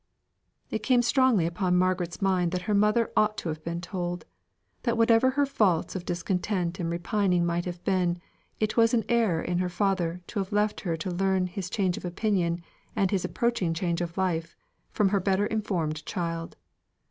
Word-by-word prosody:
It 220 - -2
came 245 +1 +3
strongly 255 - +3
upon 180 +2 0
Margaret's 185 0 0
mind 180 -3 +2
that 180 0 -2
her 210 - -1
mother 210 +3 +3
ought 215 0 +3
to 170 - -3
have 155 0 -5
been 170 +1 -3
told: 175 -2 -4 0.6
that 235 -1 0
whatever 230 +2 +5
her 285 +2 +2
faults 205 -13 +1
of 180 -2 -4
discontent 180 +1 -1
and 170 -2 -1
repining 175 +1 +1
might 170 0 -1
have 175 -1 -6
been, 180 -2 +1 0.4
it 215 0 0
was 230 0 +4
an 225 - +1
error 225 -9 +2
in 175 0 -1
her 180 0 0
father 180 -2 0
to 210 - -4
have 195 +1 -3
left 210 0 +1
her 170 -4 -2
to 170 +4 -4
learn 190 +1 +1
his 180 0 -5
change 185 -4 0
of - - -8
opinion, 175 -2 0 0.3
and 195 -2 +1
his 195 -3 0
approaching 235 -9 0
change 170 0 -1
of 170 +1 -4
life, 170 -3 -1 0.3
from 205 -2 +2
her 200 0 +2
better 195 +2 +1
informed 175 -9 -2
child. 165 0 -4
185 Hz, 185 wpm, -27 LUFS, 175-210 Hz, 0.6 s, whatever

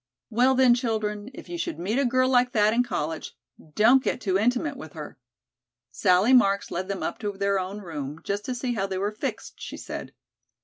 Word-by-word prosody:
"Well, 250 +4 +4
then, 255 -2 +6
children, 220 -3 -2
if - - -10
you 345 -1 -5
should 340 -1 -3
meet 210 +9 -1
a 280 - +2
girl 255 +1 +2
like 250 -1 +3
that 215 0 +4
in 240 - +3
college, 160 -9 -3 0.4
don't 240 +5 +6
get - - -1
too 190 -6 -1
intimate 245 +8 +1
with 160 - -10
her." 155 -4 -9 0.7
Sally 185 - +3
Marks 200 -5 +4
led 185 +2 -3
them 195 -1 -4
up - - -3
to 205 -2 -3
their 200 0 0
own 190 +3 -5
room, 150 -4 -6
just 200 +1 -2
to 255 - -3
see 245 0 -2
how 195 -4 -1
they 190 -1 -3
were 200 +2 -1
fixed, 215 - -6
she - - -7
said. - - -7
210 Hz, 210 wpm, -26 LUFS, 195-250 Hz, 0.7 s, then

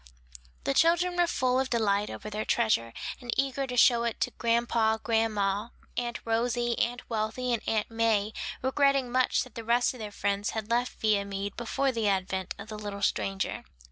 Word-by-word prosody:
The 275 - +1
children 345 +4 +3
were 350 -1 +3
full 255 -5 +1
of 265 0 0
delight 210 -3 +1
over 215 - -7
their 215 +1 -2
treasure, 215 - +1 0.3
and 245 -2 -5
eager 270 0 0
to 250 -1 -4
show 235 -1 +6
it 235 -1 -2
to 250 - +1
grandpa, 230 -2 +1
grandma, 215 -2 0 0.3
Aunt 240 -1 -2
Rosie, 235 +1 +1
Aunt 245 +1 -1
Wealthy 230 +3 -1
and 230 - 0
Aunt 220 0 0
May; 220 -2 +1 0.3
regretting 275 -1 +2
much 255 0 +2
that 255 - -14
the 230 - -6
rest 240 +3 +2
of 250 - -11
their 215 -1 -5
friends 200 0 -1
had 220 +1 -4
left 245 +1 0
Viamede 200 -2 0
before 265 +3 0
the 225 -4 -1
advent 190 -1 -1
of 200 - -9
the 215 -1 -6
little 200 -1 -5
stranger. 195 -1 -1
230 Hz, 180 wpm, -29 LUFS, 210-250 Hz, 0.3 s, show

